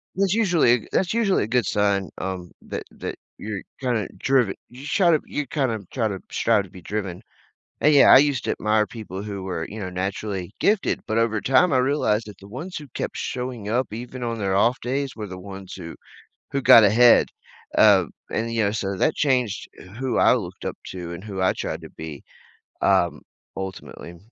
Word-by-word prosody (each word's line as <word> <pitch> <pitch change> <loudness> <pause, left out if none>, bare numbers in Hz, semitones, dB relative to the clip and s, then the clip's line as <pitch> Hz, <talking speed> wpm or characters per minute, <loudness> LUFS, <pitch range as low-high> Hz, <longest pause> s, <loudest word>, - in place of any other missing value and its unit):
that's 195 0 +2
usually 170 - +3
that's 185 0 +1
usually 220 -4 +2
a - - -3
good 120 -1 +1
sign, 100 -1 +1
um, 95 -2 -5
that - - -6
that - - -6 0.2
you're 105 -3 -5 0.2
kinda 120 -6 0
drive 130 -4 +3 0.2
you're 125 +3 -11
try 175 0 +3
to 155 - +4
you're 150 - -3
kinda 125 -5 -1
trying 110 -5 0
to 95 - -5
trying 110 -3 +2
to 95 - -14
be 90 - -12
driven, 95 -2 -4 0.6
and, 150 - +5
yeah, 140 - +7
I - - +11
used 140 -2 +2
to - - +1
admire 105 0 +1
people 100 -4 -7
who 100 -2 -5
were, 90 -4 -3
you 110 - -7
know, 95 -3 -4
naturally 95 0 -3
gifted, 205 -1 +2
but 110 - 0
over 115 -2 +2
time, 135 +7 +4
I 130 - +3
realized 125 -5 +1
that 105 - -10
the 100 - -13
ones 155 - -7
who 150 - -8
kept - - -4
showing 125 -4 -4
up, 120 +1 0
even 125 +3 -7
on 115 -1 -2
their 100 -3 -1
off 120 +5 +3
days, 135 +2 -2
were 105 -2 -6
the 95 -1 -8
ones 95 0 -9
who 85 -3 -8 0.6
who 140 - -1
got 115 - +8
ahead, 115 +4 +6 0.5
uh, - - +6 0.3
and, 115 +1 -1
you 115 -1 +1
know 100 - +1
so 100 -2 -2
that 155 - +2
changed 125 -7 0 0.3
who 130 -1 -1
I - - +6
looked - - -6
up - - -3
to 90 -2 -6
and 85 +2 -8
who 100 -3 -5
I 95 - +3
tried - - -4
to - - -10
be, 80 -3 -8 0.6
um, 85 -6 +2 0.4
ultimately. 95 -2 -7
110 Hz, 200 wpm, -23 LUFS, 95-130 Hz, 0.6 s, I